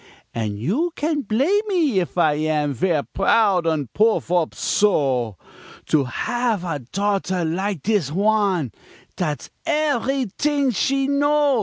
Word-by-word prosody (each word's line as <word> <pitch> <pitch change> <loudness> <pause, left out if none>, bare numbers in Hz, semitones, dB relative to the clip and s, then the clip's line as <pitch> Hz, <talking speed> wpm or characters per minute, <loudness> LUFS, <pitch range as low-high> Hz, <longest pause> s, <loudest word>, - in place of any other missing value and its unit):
An' 110 -3 -3
you 225 - -1
can' 300 0 -1
blame 275 - +1
me 320 - +2
if 180 0 -4
I 155 -4 +4
am 150 -1 0
Ver' 155 +1 0
proud 195 -3 +2
an' 155 -4 0
puff 215 -5 +2
op 175 -3 +1
so, 130 - +1 0.5
To 145 -3 +3
hav' 235 - -1
a 165 -5 -3
daughter 190 - -1
like 185 0 -2
dis 200 - 0
wan 195 - +1 0.4
Dat's 155 -6 -3 0.2
everyt'ing 280 - 0
she 270 +4 +1
know. 285 -1 +2
195 Hz, 130 wpm, -22 LUFS, -, 0.5 s, I